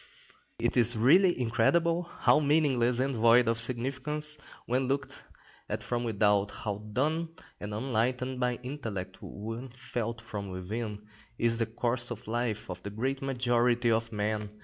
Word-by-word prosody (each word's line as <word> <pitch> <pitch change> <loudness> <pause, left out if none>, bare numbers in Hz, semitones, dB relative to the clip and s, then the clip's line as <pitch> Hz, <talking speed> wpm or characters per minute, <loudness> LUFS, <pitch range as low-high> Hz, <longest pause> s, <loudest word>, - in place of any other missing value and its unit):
It - - 0
is 120 -1 +7
really 175 - +5
incredible 165 +9 +2
how - - +5
meaningless 140 -5 +2
and 135 +2 0
void 115 +1 +5
of 115 0 +1
significance 135 +5 0 0.3
when 130 +2 0
looked 140 +2 -3 0.5
at 105 +1 -3
from 120 +3 -2
without, 105 -3 +2
how 105 0 -5
dull 155 +8 0 0.3
and 105 - -6
unenlightened 125 +3 -1
by 125 -1 +1
intellect 110 -9 -5
when 115 +5 -6
felt 120 -2 -4
from 105 -3 -6
within, 105 +3 -5 0.3
is 115 0 +1
the 115 - +1
course 120 +1 -2
of 120 -3 -6
the 110 - -7
life 115 -3 -2
of 90 -1 -7
the 100 - -6
great 130 +6 -2
majority 120 -2 +2
of 115 0 0
men. 105 0 -2
120 Hz, 150 wpm, -29 LUFS, 110-130 Hz, 0.5 s, is